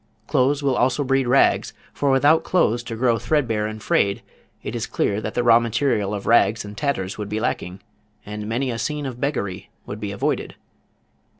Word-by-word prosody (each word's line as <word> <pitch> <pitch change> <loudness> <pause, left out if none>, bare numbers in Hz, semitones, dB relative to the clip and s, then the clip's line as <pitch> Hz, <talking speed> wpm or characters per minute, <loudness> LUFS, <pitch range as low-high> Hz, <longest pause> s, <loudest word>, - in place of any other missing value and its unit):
Clothes 140 +3 +1
will 135 -2 +2
also 130 +4 +1
breed 135 -1 +1
rags, 135 +3 +3 0.2
for 140 - 0
without 145 +4 +4
clothes 120 -10 +1
to 115 - -5
grow 115 -1 +1
threadbare 115 -9 0
and 110 0 -7
frayed, 100 0 +1 0.4
it - - -5
is - - -3
clear 100 +1 -1
that - - -5
the 120 - +1
raw 115 -1 +6
material 115 -3 0
of 100 - -6
rags 115 -2 +3
and 105 0 -9
tatters 100 -7 -2
would 105 -1 -4
be 105 - -2
lacking, 95 -4 -3 0.4
and 105 +1 -6
many 125 +3 -1
a 115 - -4
scene 150 +2 -2
of 125 -2 -6
beggary 100 -10 -3 0.2
would 105 - -7
be 105 -2 -4
avoided. 100 - -2
115 Hz, 190 wpm, -22 LUFS, 105-135 Hz, 0.4 s, raw